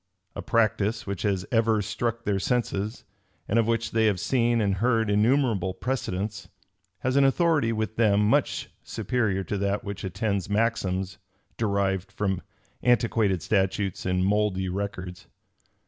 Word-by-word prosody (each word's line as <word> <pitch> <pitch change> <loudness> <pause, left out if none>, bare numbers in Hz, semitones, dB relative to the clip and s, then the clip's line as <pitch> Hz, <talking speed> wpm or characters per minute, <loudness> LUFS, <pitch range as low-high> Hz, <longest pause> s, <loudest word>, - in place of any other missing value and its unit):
A - - -4
practice 110 -1 +1
which 100 -2 -4
has 95 -3 0
ever 115 -2 +3
struck 115 +2 -2
their 100 -3 0
senses, 110 -1 -1 0.4
and 115 - +2
of 115 - +2
which 115 0 0
they 110 -1 +3
have 100 -4 +1
seen 120 +5 +2
and 100 -3 +1
heard 115 0 +2
innumerable 105 -4 +2
precedents, 105 -5 -3 0.5
has 130 +2 +1
an 140 - +6
authority 145 -3 +3
with 110 -1 -3
them 105 -3 +4
much 110 - +1
superior 110 -3 -1
to 100 +1 -3
that 100 +2 -1
which 100 -2 -6
attends 100 +1 -2
maxims 100 -4 0 0.4
derived 100 -3 0
from 95 -2 -1 0.4
antiquated 115 -7 +2
statutes 95 -1 0
and 90 0 +1
mouldy 100 -2 +1
records. 90 -2 -5
105 Hz, 140 wpm, -26 LUFS, 95-115 Hz, 0.5 s, an